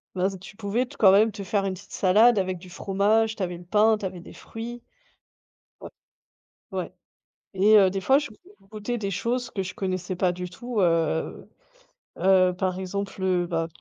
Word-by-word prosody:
ben, 190 +1 0
tu 185 - -12
pouvais 225 +4 -1
quand 200 -5 +4
même 215 +3 +5
te 200 0 -7
faire 195 +1 0
une 190 - -1
petite 195 +2 -15
salade 210 +4 +4
avec 185 -1 -2
du 180 +1 -13
fromage, 210 +4 +1
tu 200 - -3
avais 175 -1 -4
le 175 - -12
pain, 215 +4 +3
tu 205 - -5
avais 185 -1 -5
des 170 - -12
fruits. 235 +2 -8 1.0
Ouais. - - -9 0.8
Ouais, - - -4 0.6
et 200 +3 +5
heu, 195 -2 +6
des 195 +1 -3
fois 265 +8 +4
je 295 - -6
je 365 - -23
goûtais 215 +4 -4
des 200 -3 -3
choses 240 +6 -2
que 195 - -3
je 180 - -6
connaissais 185 -1 -3
pas 180 0 +1
du 180 0 -6
tout, 240 +4 -5
heu 165 -2 0 0.7
heu, 185 -1 +4
par 185 -1 -1
exemple, 195 +1 -5
heu, 180 -2 +1
ben, 165 -1 -1
195 Hz, 190 wpm, -25 LUFS, 185-215 Hz, 1.0 s, heu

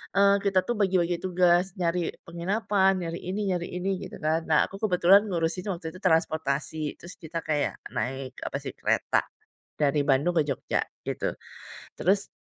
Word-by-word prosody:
Eee, 200 0 +6
kita 195 -2 +2
tuh 240 - 0
bagi-bagi 180 -3 +2
tugas, 180 0 +2
nyari 175 -1 0
penginapan, 190 +3 +1
nyari 165 +1 -4
ini 195 +3 -2
nyari 175 -1 -1
ini 185 +1 -1
gitu - - -10
kan. 155 +1 +2
Nah, 155 -2 +4
aku - - -8
kebetulan 190 +3 +5
ngurusin 175 0 -1
waktu 170 -2 -5
itu 185 - -12
transportasi, 155 -3 0
terus 175 - -11
kita 165 0 -5
kayak 150 -2 0 0.2
naik 130 0 -4
apa - - -5
sih, - - -4
kereta, - - +1 0.6
dari 145 0 +2
Bandung 140 +5 +2
ke - - +5
Jogja 140 -3 -1 0.2
gitu. - - -2 0.6
Terus, 195 +2 +2
175 Hz, 160 wpm, -27 LUFS, 160-190 Hz, 0.6 s, Eee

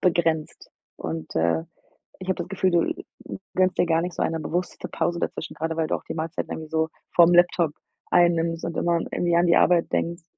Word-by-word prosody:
begrenzt 165 -3 0 0.3
und, 80 0 -5
äh, 85 - +1 0.6
ich 185 - -8
habe 190 - +1
das 175 - -4
Gefühl, 190 -1 +1
du 170 -1 -2 0.2
gönnst 185 0 +2
dir - - +4
gar 165 0 +2
nicht 175 -1 -4
so - - -2
eine 165 - 0
bewusste 175 +3 -3
Pause 170 0 -1
dazwischen, - - -4
gerade 160 0 -3
weil 160 -1 0
du - - +1
auch - - -13
die - - -6
Mahlzeit 165 +2 -3
irgendwie 155 -1 -6
so 160 0 0 0.2
vorm 175 0 +6
Laptop 175 -2 +4 0.4
einnimmst 170 -1 +3
und 170 - -4
immer 170 -1 +1
irgendwie 175 -1 +1
an 175 +1 +4
die 170 - +4
Arbeit 175 -2 +4
denkst, 170 +1 -1
170 Hz, 205 wpm, -24 LUFS, 160-175 Hz, 0.6 s, vorm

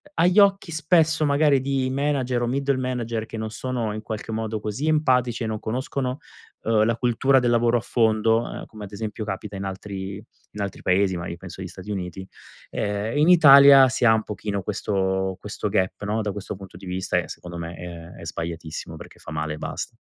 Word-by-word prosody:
agli 180 +4 +4
occhi 195 -3 +4
spesso 160 0 +2
magari 145 -2 +3
di 135 -1 0
manager 135 -3 0
o 120 - 0
middle 140 +1 0
manager 120 -3 -2
che 115 - -7
non 110 0 -4
sono 115 -2 -3
in 110 - -5
qualche 110 0 -6
modo, 110 -1 -2
così 110 +9 -3
empatici 125 -6 +2
e - - -2
non 110 -1 -3
conoscono, 130 +3 -3 0.5
uhm, 110 -1 +3
la 115 0 +1
cultura 125 +3 +3
del 120 -1 +1
lavoro 120 0 +3
a 115 - -2
fondo, 115 -1 +2
ehm, - - -7
come 105 -2 -10
ad 100 - -12
esempio 110 +1 -5
capita 100 0 -5
in 95 - -4
altri 95 0 -5 0.4
in 105 - -4
altri 100 - -5
Paesi, 95 0 +2
magari 85 0 -5
penso 95 0 -9
agli 90 - -5
Stati 95 +3 -11
Uniti, 95 -1 -5 0.4
ehm, 105 +4 -2
in 150 - +4
Italia 140 -5 +9
si 130 -1 0
ha 110 - +7
un 110 - +2
pochino 100 -1 -4
questo 95 -1 -1
questo 105 +1 -4
gap 95 0 -1
no, 110 +2 0
da 105 -1 -2
questo 105 0 -6
punto 95 -1 -12
di - - -12
vista 90 0 -2
e 85 - -1
secondo 85 -1 -8
me, 85 0 -5
è 85 0 -9
è - - -9
sbagliatissimo 80 -1 -5
perché - - -12
fa - - -10
male 75 0 -2
e - - -11
basta. - - -5
110 Hz, 205 wpm, -24 LUFS, 95-130 Hz, 0.5 s, Italia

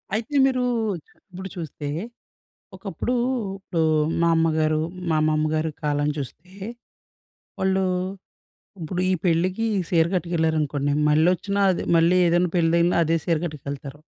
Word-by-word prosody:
అయితే! 225 +6 -3
మీరు 255 -2 +1 0.7
ఇప్పుడు 190 +2 -7
చూస్తే. 155 -4 -6 0.9
ఒకప్పుడు 250 - -4 0.5
ఇప్పుడు 180 -4 -2 0.4
మా 170 - +4
అమ్మగారు, 155 -1 +2 0.3
మా 160 - +2
అమ్మమ్మగారి 155 +1 +1
కాలం 145 0 0
చూస్తే 150 +5 -7 1.1
వాళ్ళు 190 0 +1 1.0
ఇప్పుడు 175 +3 -3
ఈ - - +3
పెళ్ళికి 185 +5 +1
ఈ - - +1
సీరకట్టుకేళ్ళారనుకోండి. 160 -4 +1 0.2
మళ్లొచ్చినా 180 +6 +2
అదే 180 - -1
మళ్ళీ 165 +2 +4
ఏదైనా 175 +1 +2
పెళ్ళి 165 -1 +3
తగిలినా 170 +1 +3
అదే 165 +1 +2
సీరకట్టుకెళ్తారు. 150 -4 -4
165 Hz, 110 wpm, -24 LUFS, 155-180 Hz, 1.1 s, మా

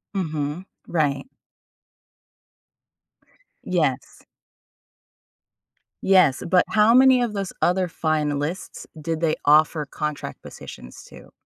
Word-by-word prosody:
Mhm, 155 -1 -3 0.2
right. 150 - -1 2.4
Yes. - - -2 1.8
Yes, 185 -8 +4
but 180 -1 +4
how 215 +1 +4
many 260 0 +6
of 235 -3 -1
those 195 -2 -4
other 180 +1 +2
finalists 155 0 -3 0.2
did 165 +1 -3
they 160 -2 +1
offer 150 +1 +4
contract 150 +1 -5
positions 60 - -11
to? - - -15
165 Hz, 90 wpm, -23 LUFS, 150-190 Hz, 2.4 s, many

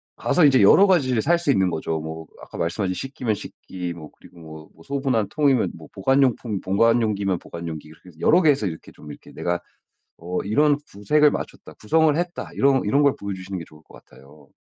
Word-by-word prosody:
가서 175 - +2
이제 130 -5 +5
여러 195 - +6
가지를 130 -11 +2
살 170 +8 +2
수 170 -5 +1
있는 95 -7 +2
거죠. 80 -1 -3
뭐 80 +1 -7 0.2
아까 - - -11
말씀하신 90 +3 -2
식기면 125 -2 -3
식기 90 -3 -7
뭐 80 -3 -11
그리고 85 - -18
뭐 80 -1 -12
뭐 80 - -19
소분한 135 - -1
통이면 135 - +1
뭐 80 -2 -13
보관용품 120 -2 +1
보관용기면 105 -2 +1
보관용기 80 -3 -8
이렇게 80 +4 -16
해서 80 -2 -19
여러 170 - +4
개 160 - +4
해서 135 -7 +2
이렇게 80 -2 -8
좀 75 -1 -12
이렇게 - - -13
내가 85 0 -2 0.6
어 90 +2 -4
'이런 145 +8 +2
구색을 145 +10 +3
맞췄다. - - -7
구성을 160 +7 +2
했다.' 175 +1 -4
이런 135 -1 +3
이런 140 +8 +2
걸 140 -2 +3
보여주시는 95 -1 -6
게 85 - -7
좋을 75 0 -18
것 - - -17
같아요. 70 +2 -19
100 Hz, 420 characters per minute, -22 LUFS, 85-140 Hz, 0.6 s, 여러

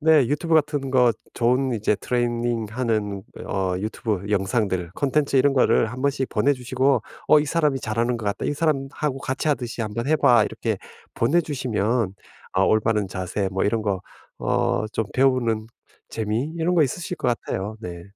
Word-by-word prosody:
네 160 +1 +4
YouTube 150 +5 +1
같은 145 -3 +1
거 125 -3 +4 0.2
좋은 125 +2 +2
이제 105 -1 +1
트레이닝하는 115 -3 -1 0.2
어 - - -4 0.2
YouTube 105 0 -3
영상들 95 -3 0
콘텐츠 140 0 +1
이런 140 +1 +4
거를 125 -3 +4
한번씩 130 0 -1
보내 145 - +2
주시고 130 +1 +1 0.3
어 150 - +7
"이 150 - -2
사람이 150 -5 +1
잘하는 115 +2 0
것 105 - -6
같다. 100 0 -2
이 - - 0
사람하고 140 -2 -1
같이하듯이 130 -4 -2
한번 115 +4 -3
해 155 - +4
봐." 120 -6 +5
이렇게 - - -2 0.4
보내 150 +10 +3
주시면 115 -7 -1 0.4
어 95 +1 +4
올바른 110 -2 +2
자세 95 +2 -2
뭐 95 - 0
이런 110 +2 +1
거 100 -3 -1 0.4
어 110 - 0
좀 115 - 0
배우는 120 -4 +2 0.4
재미 110 +3 -1
이런 170 +2 +1
거 165 - +5
있으실 175 +6 -4
것 - - -1
같아요. 110 -2 -3
네. 85 -3 -7
120 Hz, 355 characters per minute, -23 LUFS, 105-135 Hz, 0.4 s, 어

